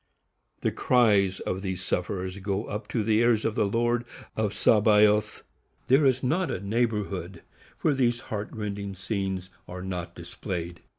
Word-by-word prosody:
The - - +1
cries 100 -6 +3
of 95 - -3
these 95 -2 -3
sufferers 95 +1 -2
go 100 +1 -2
up 105 +1 -5
to 115 - -1
the 110 0 +3
ears 115 -2 +3
of 110 - +1
the 105 - +1
Lord 120 +3 +1 0.3
of 110 -2 0
Sabaoth. 105 0 +4 0.5
_There 135 +2 +6
is 130 0 +1
not 165 +8 +1
a - - -2
neighborhood 100 -4 -2 0.4
where 150 - +3
these 120 -3 +1
heart 105 0 -3
rending 100 -2 -4
scenes 95 -2 -3 0.2
are 90 +1 -7
not 90 -2 -5
displayed. 85 -1 -6
105 Hz, 155 wpm, -27 LUFS, 95-115 Hz, 0.5 s, There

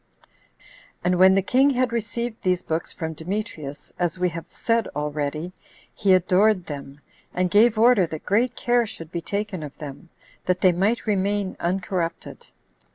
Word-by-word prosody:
15. - - -24 0.4
And 180 +1 +2
when 190 +1 +7
the 195 - +2
king 265 +7 +4
had 255 -3 +1
received 235 +1 -3
these 180 -1 +1
books 160 +1 -3
from 160 -2 -4
Demetrius, 160 -4 -5
as 175 -1 0
we 180 0 +1
have 165 -1 -7
said 230 -1 0
already, 150 +3 -3 0.4
he 195 -3 +3
adored 185 +1 +3
them, 140 -2 -8 0.4
and 180 -1 +1
gave 220 +2 +5
order 225 -5 +5
that 155 -1 -7
great 230 +4 +1
care 240 -1 +2
should 165 -5 -9
be 170 - -3
taken 200 -1 -3
of 145 -2 -8
them, 150 +2 -9 0.4
that 180 0 +1
they 185 - +6
might 200 +7 0
remain 200 -1 0
uncorrupted. 180 -1 -3
185 Hz, 160 wpm, -24 LUFS, 165-215 Hz, 0.4 s, when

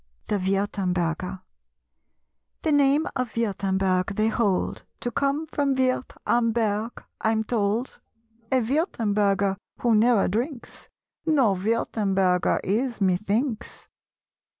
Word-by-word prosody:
THE 205 - +1
WIRTEMBERGER. 185 -2 -1 1.2
The 315 - +2
name 285 +1 +4
of 255 -3 -3
Wirtemberg 195 -3 0
they 215 +2 +2
hold 205 -5 0 0.2
To 240 - -2
come 280 +4 0
from 285 -3 0
Wirth 260 0 0
am 235 -1 +2
berg, 220 0 -1 0.2
I'm 220 0 +1
told. 220 +2 -1 0.5
A 260 -1 +3
Wirtemberger 210 - +1 0.2
who 240 -2 +3
ne'er 220 -1 +4
drinks 240 - -4 0.4
No 270 -10 +4
Wirtemberger 195 -3 +1
is, 230 +5 -1
methinks! 210 +6 -1
220 Hz, 105 wpm, -25 LUFS, 195-250 Hz, 1.2 s, name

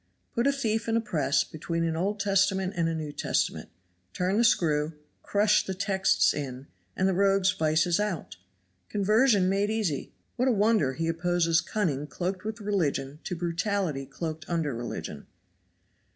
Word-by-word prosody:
Put 235 +2 +1
a - - +5
thief 230 -5 -1
in 225 - +2
a - - +3
press 160 - +1
between 165 +1 -3
an 165 -1 0
Old 200 +5 -1
Testament 195 -1 +2
and 165 -2 +1
a 165 - -2
New 155 -2 -4
Testament. - - -1 0.4
Turn 185 +2 0
the 235 - +4
screw, 155 -8 +2 0.3
crush 210 +1 +3
the 190 - -4
texts 190 0 +2
in, 135 -2 -5 0.3
and 190 - +2
the 190 - +2
rogue's 195 0 +3
vices 160 +3 +1
out! 170 - -3 0.5
Conversion 210 0 +3
made 200 +2 +1
easy! 210 -11 -1 0.3
What 250 +2 +2
a - - +4
wonder 205 -10 +2
he 165 +4 -2
opposes 170 0 +2
cunning 150 -9 -2
cloaked 185 +6 -3
with 220 +1 -5
religion 150 -8 -1
to 180 - -3
brutality 170 -4 -1
cloaked 160 +2 -6
under 165 -5 0
religion. 120 0 -6
185 Hz, 160 wpm, -28 LUFS, 160-205 Hz, 0.5 s, a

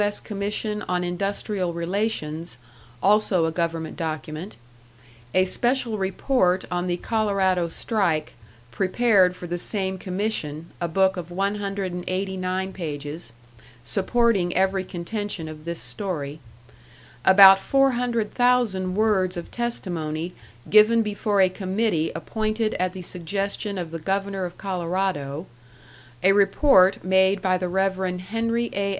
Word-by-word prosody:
S. 205 0 +1
Commission 210 +1 -3
on 180 0 0
Industrial 190 +1 -2
Relations, 170 - -2 0.5
also 200 -4 +3
a 160 - 0
government 165 -1 -2
document; 155 +2 -5 0.8
a 185 0 +5
special 240 +2 0
report 190 -1 +1
on 180 0 -1
the 175 -1 0
Colorado 195 -5 +1
strike, 170 -4 -1 0.4
prepared 190 - +3
for 180 - -9
the 175 0 -3
same 190 -1 -1
commission, 180 -6 -3 0.2
a 170 - 0
book 190 +3 +2
of 175 -1 -6
189 190 -1 -2
pages, 150 -3 -6 0.5
supporting 195 - +1
every 190 0 +2
contention 185 -1 -4
of 155 0 -10
this 170 0 -4
story; 155 -8 -4 0.8
about 195 +2 +9
four 275 +5 +3
hundred 240 -3 -1
thousand 235 -7 +2
words 195 -4 +1
of 170 - -7
testimony 175 -8 -3 0.3
given 220 +2 +6
before 205 -1 0
a 190 - +6
committee 185 -2 -1
appointed 215 +5 -1
at 180 0 0
the 185 -2 -7
suggestion 195 +4 -3
of 170 -3 -4
the 165 - -5
Governor 195 +2 -2
of 175 0 -8
Colorado; 180 -5 -2 0.8
a 190 - +6
report 200 -1 +4
made 190 +1 +3
by 185 -1 +1
the 180 0 -2
Rev. 190 +1 +1 0.2
Henry 230 +4 -1
A. 200 0 -1
190 Hz, 125 wpm, -24 LUFS, 175-205 Hz, 0.8 s, about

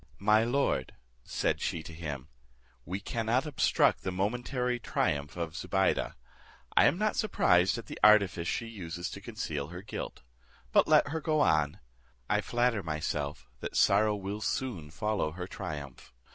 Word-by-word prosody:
"My 105 +2 +4
lord," 120 - 0 0.3
said - - -1
she 80 - -2
to 80 - -9
him, 75 -5 -6 0.6
"we 95 +2 -3
cannot 115 +6 0
obstruct 150 -4 +2
the 95 - -2
momentary 125 +6 -1
triumph 75 -7 -1
of 85 -2 -3
Zobeide. 95 +1 0 0.6
I - - +7
am - - +4
not 215 +1 +1
surprised 90 - +3
at 115 - -7
the - - -8
artifice 100 -5 +5
she 115 - -1
uses 85 -6 -5
to - - -8
conceal 70 -2 -4
her 90 +3 -8
guilt: 105 - -6 0.5
but - - +5
let - - +5
her 160 +2 -3
go 155 -1 +1
on; 75 - +2 0.5
I - - +2
flatter 120 -3 +1
myself 75 -4 -3
that - - -4
sorrow 105 +1 +4
will 100 +1 -5
soon 110 -12 -2
follow 100 -2 -1
her 90 +1 -5
triumph. 75 -7 -7
95 Hz, 155 wpm, -30 LUFS, 80-115 Hz, 0.6 s, I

